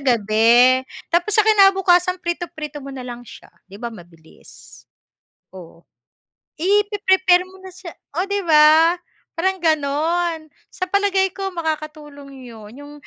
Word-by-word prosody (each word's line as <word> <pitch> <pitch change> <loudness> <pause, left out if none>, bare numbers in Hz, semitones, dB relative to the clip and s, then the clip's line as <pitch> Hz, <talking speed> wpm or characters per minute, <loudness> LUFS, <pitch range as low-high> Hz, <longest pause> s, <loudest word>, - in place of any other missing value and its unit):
gabi, 235 +2 +3 0.3
tapos 345 +5 0
sa 430 - +4
kinabukasan, 385 -3 +3
prito-prito 335 -4 -6
mo 275 0 -9
na 260 - -8
lang 240 0 -8
siya, - - -15 0.2
'di 195 +1 -13
ba 235 - -4
mabilis. 170 -6 -17 0.7
Oo. 170 -2 -14 0.7
I 405 +5 +2
pre-prepare 380 -3 +2
mo 380 - -17
na 375 - -11
siya 360 -2 -11 0.2
oh, 360 - 0
'di 405 0 -1
ba, 315 +1 +5 0.4
parang 380 +3 -1
ganon. 320 +2 -1 0.2
Sa 370 - -5
palagay 390 -1 0
ko, 390 -1 -4
makakatulong 300 -4 -7
'yun, 215 -2 -13
'yung 290 +1 -12
320 Hz, 135 wpm, -19 LUFS, 260-370 Hz, 0.7 s, ba